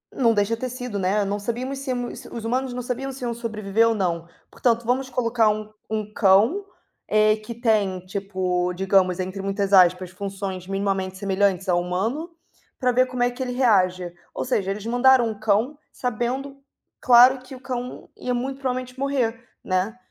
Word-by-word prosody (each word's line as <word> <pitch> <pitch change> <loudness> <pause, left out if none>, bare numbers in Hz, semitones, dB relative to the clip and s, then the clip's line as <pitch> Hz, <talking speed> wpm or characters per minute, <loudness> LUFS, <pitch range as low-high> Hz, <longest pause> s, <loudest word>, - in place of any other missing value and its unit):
não 235 -4 +3
deixa 210 +2 +1
ter 255 +3 -4
sido, 245 -5 -5
né, 200 +2 +1
não 200 +1 -2
sabíamos 250 +6 -3
se 275 -1 -3
os 240 -2 -6
humanos 255 +2 -1
não 250 - -3
sabiam 260 +2 -3
se 260 -1 -9
iam 235 - -1
sobreviver 225 -1 0
ou 225 - +1
não. 170 -4 -1 0.2
Portanto 235 -1 0
vamos 260 +2 0
colocar 230 -3 +2
um 215 0 -3 0.2
um 215 -1 -3
cão, 220 - +4 0.4
eh, 215 0 +4
que 215 +2 -8
tem 215 -6 +1
tipo, 185 -2 -1
digamos, 190 -1 +2
entre 185 +1 -4
muitas 195 0 -1
aspas 180 -1 +5
funções 195 -1 -5
minimamente 195 -1 -2
semelhantes 195 -1 +1
a 180 - +4
humano, 195 - -1 0.5
para 250 -2 +2
ver 255 +1 +4
como 255 -1 -4
é 245 - +3
que 245 - -9
ele 255 -1 -2
reage, 185 -8 +2 0.2
ou - - -3
seja 200 -7 0
eles 205 +1 -5
mandaram 245 0 +4
um 215 - -6
cão 220 +7 +1
sabendo, 255 +3 -3 0.4
claro 250 +1 +7
que 255 +1 -11
o - - -11
cão 250 -2 -5
ia 250 - -2
muito 265 +2 -3
provavelmente 255 -1 -3
morrer, 250 -4 -1 0.2
né. 185 +5 -1
225 Hz, 175 wpm, -23 LUFS, 195-250 Hz, 0.5 s, claro